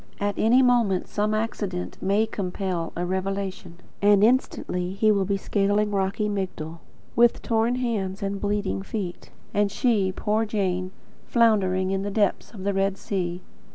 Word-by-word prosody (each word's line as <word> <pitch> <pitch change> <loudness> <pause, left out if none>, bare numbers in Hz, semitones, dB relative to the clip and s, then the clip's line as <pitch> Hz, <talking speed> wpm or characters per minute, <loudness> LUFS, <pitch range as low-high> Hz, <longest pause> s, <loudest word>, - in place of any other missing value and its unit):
At 205 0 0
any 245 +4 +4
moment 235 -7 +2
some 210 +1 0
accident 205 -5 -3
may 200 +3 +2
compel 185 -4 -3
a 175 - -2
revelation; 190 -1 -3 0.2
and 205 0 +5
instantly 190 -6 +1
HE 215 +2 +3
will 200 -2 +2
be 200 +1 0
scaling 205 +1 +1
rocky 200 +2 0
Migdol, 185 -5 -4 0.4
with 235 0 +4
torn 230 +1 +1
hands 210 -6 -2
and 195 0 -3
bleeding 205 -2 -1
feet; 195 -3 -5 0.2
and 205 -1 +2
she 205 -4 +2
poor 210 +4 0
Jane 185 -4 -1 0.4
floundering 190 -5 +3
in 195 0 0
the 200 - -2
depths 205 -1 0
of 200 -5 -9
the 200 0 0
Red 195 0 0
Sea. 180 -3 -3
200 Hz, 155 wpm, -25 LUFS, 190-215 Hz, 0.4 s, and